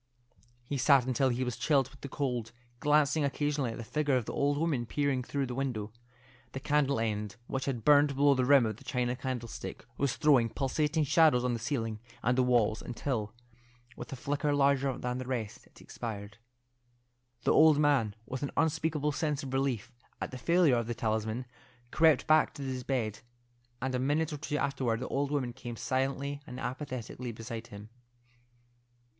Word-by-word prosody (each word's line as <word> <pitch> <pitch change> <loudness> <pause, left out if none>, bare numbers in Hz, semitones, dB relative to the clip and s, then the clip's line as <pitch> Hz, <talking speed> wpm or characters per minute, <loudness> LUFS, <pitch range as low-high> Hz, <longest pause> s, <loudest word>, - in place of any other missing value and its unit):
He 135 +3 -3
sat 135 -1 +5
until 130 +1 +2
he 125 +1 -1
was 125 -1 -3
chilled 135 -4 +2
with 135 - -18
the 140 - -6
cold, 125 -5 -2 0.3
glancing 150 +1 +3
occasionally 145 -2 0
at - - -8
the 115 - -6
figure 145 +4 0
of 120 - -2
the - - -5
old 145 0 +1
woman 145 -7 0
peering 140 0 0
through 140 +2 -2
the 125 - -5
window. 120 -5 -3 0.6
The 135 - -4
candle 140 -2 +1
end, 105 -2 -2
which 135 +1 -3
had 125 -5 -3
burned 145 -1 +5
below 140 +1 +5
the 130 -1 +1
rim 135 -1 +6
of 110 -2 -3
the - - -15
china 125 -1 -1
candlestick, 125 -4 -5
was 140 -3 +1
throwing 135 -6 +4
pulsating 150 +5 0
shadows 150 -3 +4
on 125 -1 +1
the 115 - -2
ceiling 115 -3 -2 0.2
and 125 +2 +2
walls, 120 -4 +3
until, 120 -3 -3 0.6
with - - -8
a - - -4
flicker 145 +2 -1
larger 140 -2 +2
than 125 0 -3
the 130 - -6
rest, 115 -5 -4
it - - -20
expired. 100 -2 -7 1.0
The - - +3
old 155 -1 +6
man, 140 -9 +2
with 130 +1 -5
an 140 - -2
unspeakable 160 -2 +1
sense 150 -1 -1
of 135 -1 -6
relief 135 -4 -1 0.3
at - - -4
the 130 - -7
failure 170 -3 +4
of 115 -1 -2
the 120 - -3
talisman, 110 +2 -1 0.5
crept 160 -4 +4
back 155 0 +4
to 140 - -6
his 130 -1 -3
bed, 120 -6 -2 0.6
and 130 +1 -2
a 125 - 0
minute 150 +4 0
or - - -3
two 150 0 -3
afterward 130 -5 0
the - - -4
old 140 0 0
woman 135 -5 -1
came 120 -1 -7
silently 135 +3 -2
and 125 - -7
apathetically 130 -2 -5
beside 115 0 -7
him. 105 +1 -10
130 Hz, 185 wpm, -31 LUFS, 120-145 Hz, 1.0 s, rim